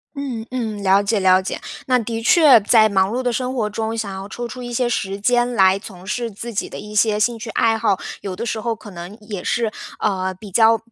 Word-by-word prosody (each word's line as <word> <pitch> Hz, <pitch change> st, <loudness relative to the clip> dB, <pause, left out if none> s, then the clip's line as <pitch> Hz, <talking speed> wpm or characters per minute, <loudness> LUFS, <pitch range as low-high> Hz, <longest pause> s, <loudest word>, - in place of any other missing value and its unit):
嗯， 255 Hz, -6 st, -4 dB
嗯， 220 Hz, -5 st, -3 dB
了 195 Hz, +1 st, +4 dB
解 205 Hz, 0 st, 0 dB
了 185 Hz, 0 st, +5 dB
解。 190 Hz, -, -5 dB, 0.2 s
那 255 Hz, -2 st, +3 dB
的 230 Hz, -1 st, -3 dB
确 295 Hz, -3 st, +7 dB
在 215 Hz, +1 st, +4 dB
忙 190 Hz, -1 st, +2 dB
碌 255 Hz, +2 st, -1 dB
的 245 Hz, -, +1 dB
生 255 Hz, +2 st, -2 dB
活 215 Hz, -3 st, 0 dB
中， 220 Hz, +2 st, -3 dB
想 210 Hz, -3 st, -3 dB
要 190 Hz, +1 st, -7 dB
抽 240 Hz, +3 st, -6 dB
出 250 Hz, +1 st, -7 dB
一 245 Hz, 0 st, -6 dB
些 240 Hz, 0 st, +1 dB
时 195 Hz, -4 st, -2 dB
间 245 Hz, +3 st, +2 dB
来 190 Hz, -2 st, +4 dB
从 190 Hz, -3 st, -11 dB
事 235 Hz, +3 st, -2 dB
自 230 Hz, +3 st, -8 dB
己 -, -, -2 dB
的 -, -, -8 dB
一 210 Hz, 0 st, -9 dB
些 210 Hz, 0 st, +3 dB
兴 230 Hz, +2 st, 0 dB
趣 220 Hz, 0 st, -7 dB
爱 225 Hz, +1 st, +2 dB
好， 210 Hz, -4 st, +1 dB, 0.2 s
有 190 Hz, -2 st, -5 dB
的 235 Hz, -, -4 dB
时 220 Hz, -1 st, -2 dB
候 230 Hz, +1 st, -2 dB
可 215 Hz, -1 st, -12 dB
能 175 Hz, +3 st, -9 dB
也 205 Hz, -3 st, -6 dB
是， 230 Hz, +1 st, 0 dB, 0.3 s
呃， 190 Hz, -2 st, -1 dB
比 195 Hz, +2 st, -12 dB
较 225 Hz, +3 st, +5 dB
220 Hz, 260 characters per minute, -20 LUFS, 200-240 Hz, 0.3 s, 确